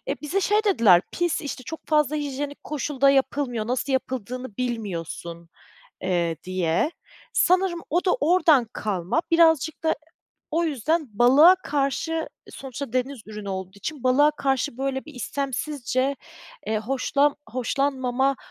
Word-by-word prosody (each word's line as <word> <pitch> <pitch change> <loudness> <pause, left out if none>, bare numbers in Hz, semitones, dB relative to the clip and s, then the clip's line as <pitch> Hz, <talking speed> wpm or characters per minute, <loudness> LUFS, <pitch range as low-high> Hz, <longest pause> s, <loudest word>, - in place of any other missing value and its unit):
e, - - -2
bize 305 +7 -1
şey 420 +3 +2
dediler 225 - +5
pis, 345 -2 0
işte, 280 -3 -6
çok 320 +6 -7
fazla 300 -1 +2
hijyenik 285 0 -4
koşulda 280 -2 +1
yapılmıyor, 265 -4 0
nasıl 255 +3 -1
yapıldığını 255 -3 -3
bilmiyorsun. 170 -8 -4 0.6
Iıı, 175 -3 0
diye 185 - 0 0.4
sanırım 365 -1 +2
o 350 +4 +1
da 365 - +4
oradan 315 -5 +4
kalma, 200 - -1
birazcık 320 -2 +3
da 320 - +2 0.6
o 335 +2 +1
yüzden 310 +2 0
balığa 280 +9 +7
karşı, 285 +3 -1 0.3
e, - - -13
sonuçta 270 -2 -7
deniz 255 0 -1
ürünü 210 -1 -7
olduğu 190 0 -5
için 290 +6 -6
balığa 275 +4 +5
karşı 270 -3 -1
böyle 265 0 -2
bir 305 0 -12
istemsizce, 270 0 -2 0.5
eee, 220 0 0
hoşlan 270 +5 +1
hoşlanmama 265 +1 0
270 Hz, 135 wpm, -24 LUFS, 235-300 Hz, 0.6 s, balığa